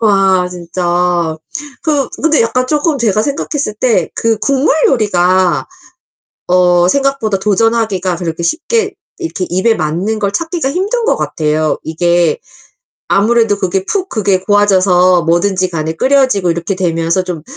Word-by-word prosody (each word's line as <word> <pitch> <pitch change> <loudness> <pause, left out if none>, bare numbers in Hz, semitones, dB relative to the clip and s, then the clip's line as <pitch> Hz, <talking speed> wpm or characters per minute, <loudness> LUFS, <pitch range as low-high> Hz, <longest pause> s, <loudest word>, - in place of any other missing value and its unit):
와 195 -4 +2
진짜. 175 -1 -1 0.5
그 290 -5 0
근데 310 -4 +3
약간 255 +3 0
쪼끔 300 0 0
제가 215 -3 +1
생각했을 280 -3 -3
때 230 +1 0
그 225 -1 0
국물 275 +3 +1
요리가 185 -6 +1 0.8
어 180 -1 +3
생각보다 275 -6 0
도전하기가 205 -3 0
그렇게 170 -1 -4
쉽게 410 - -1 0.2
이렇게 330 - -4
입에 190 +6 +1
맞는 180 +8 -2
걸 200 -1 -1
찾기가 330 - -2
힘든 410 - -1
것 - - +2
같아요. 155 0 -1
이게 175 - +1 0.7
아무래도 220 0 +2
그게 190 -1 -1
푹 385 - -2
그게 200 - 0
고아져서 185 -3 +3
뭐든지 185 +2 +1
간에 160 -1 -3
끓여지고 260 -7 +2
이렇게 170 +3 -3
되면서 170 0 0
좀 170 -4 -5
195 Hz, 295 characters per minute, -13 LUFS, 175-255 Hz, 0.8 s, 근데